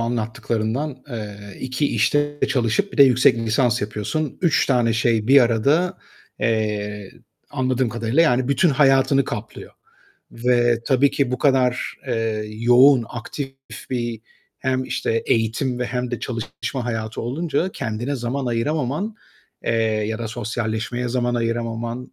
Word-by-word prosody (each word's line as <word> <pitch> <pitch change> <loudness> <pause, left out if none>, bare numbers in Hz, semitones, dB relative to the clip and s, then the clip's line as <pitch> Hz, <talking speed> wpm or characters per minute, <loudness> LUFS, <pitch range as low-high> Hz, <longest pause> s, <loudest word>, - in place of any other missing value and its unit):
anlattıklarından, 115 +3 -2
eee, 105 -3 -6 0.2
2 130 +3 -1
işte 145 0 +1
çalışıp 135 - 0
bir - - -9
de - - +10
yüksek 125 -2 +4
lisans 115 +1 +1
yapıyorsun. 105 +9 -3
3 165 -8 +3
tane 120 -4 +2
şey 110 -1 +1
bir 140 +1 +8
arada, 140 +10 +2 0.4
eee, 105 -2 -1 0.4
anladığım 130 -2 0
kadarıyla 115 +6 +1
yani 130 -5 +2
bütün 140 +6 +3
hayatını 135 -1 +4
kaplıyor - - -7 0.6
ve 120 -1 +2
tabii 135 +1 +4
ki 135 -3 0
bu 125 - -1
kadar, 130 -3 +1
eee, 115 -3 -1
yoğun, 120 +4 +5
aktif 135 +3 -6 0.4
bir 120 -3 -2 0.4
hem 130 0 -1
işte 115 -2 -1
eğitim 115 +3 0
ve 125 - -1
hem 125 0 -3
de 120 - -4
çalışma 120 +1 -4
hayatı 110 -2 -3
olunca 160 +8 -1
kendine 120 +3 -3
zaman 125 +2 -3
ayıramaman, 145 - -1 0.5
eee, - - +1
ya 110 0 -1
da 115 -1 -4
sosyalleşmeye 115 +2 -3
zaman 120 0 0
ayıramaman, 115 +1 -3
120 Hz, 135 wpm, -22 LUFS, 115-135 Hz, 0.6 s, de